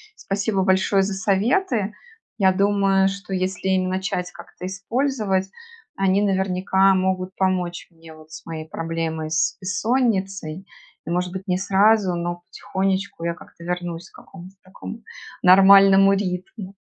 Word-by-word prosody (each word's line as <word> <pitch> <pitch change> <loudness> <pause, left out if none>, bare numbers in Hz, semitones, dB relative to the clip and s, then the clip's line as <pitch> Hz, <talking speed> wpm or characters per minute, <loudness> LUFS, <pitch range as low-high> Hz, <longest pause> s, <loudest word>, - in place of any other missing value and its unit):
Спасибо 200 - -2
большое 190 +1 +2
за 195 +1 -2
советы. 210 - 0 0.4
Я 190 -2 +3
думаю, 195 0 +2
что 195 0 -7
если 185 0 -2
им 185 -1 +1
начать 185 -1 -3
как-то 180 - -11
использовать, 195 -1 -1 0.5
они 195 +1 +2
наверняка 190 0 +2
могут 185 0 -1
помочь 180 -2 -1
мне 165 -1 -15
вот 155 0 -17
с - - -10
моей 160 -1 -7
проблемой- 165 -1 -4
с 155 -1 0
бессонницей. 195 -5 -1 0.4
И, - - -7
может 180 +1 -1
быть, 190 +1 -7
не 180 - +1
сразу, 195 0 +3
но 175 0 -4
потихонечку 195 -2 -3
я 170 - 0
как-то 170 - -15
вернусь 175 0 -5
к - - -24
какому-то 185 0 -13
такому 215 +4 -10 0.4
нормальному 195 +1 +7
ритму. 190 +1 -4
190 Hz, 135 wpm, -22 LUFS, 180-195 Hz, 0.5 s, нормальному